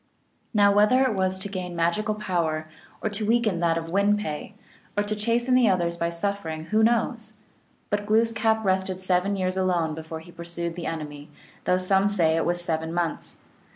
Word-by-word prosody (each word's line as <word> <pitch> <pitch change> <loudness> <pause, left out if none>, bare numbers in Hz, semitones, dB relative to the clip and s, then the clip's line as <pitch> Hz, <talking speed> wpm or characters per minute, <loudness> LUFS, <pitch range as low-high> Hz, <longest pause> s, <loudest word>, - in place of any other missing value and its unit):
Now 205 -2 +4
whether 210 +6 +5
it 260 -4 +1
was 190 -1 0
to 190 - +1
gain 185 -3 -5
magical 170 +6 0
power, 165 -6 -1 0.4
or 220 - +1
to 210 +1 -2
weaken 220 -4 +2
that 165 -1 +2
of 165 0 -5
Win 200 +2 +3
pe, 155 -8 -5 0.4
or 205 - +3
to 210 +1 -2
chasten 235 +4 0
the 250 -3 +5
others 175 -2 +1
by 170 0 -1
suffering, 170 -3 -3
who 215 - +4
knows? 230 -1 +1 0.6
But 205 0 -1
Glooskap 220 0 +2
rested 190 -1 0
seven 185 +1 +1
years 185 -1 -1
alone 175 -4 +1
before 160 0 -7
he 175 - -14
pursued 170 0 -4
the 175 - -5
enemy, 150 -2 -6 0.4
though 180 - +3
some 190 +2 +2
say 170 -6 +2
it 165 - 0
was 175 0 0
seven 160 -1 -2
months. 170 -3 -3
185 Hz, 185 wpm, -25 LUFS, 170-210 Hz, 0.6 s, whether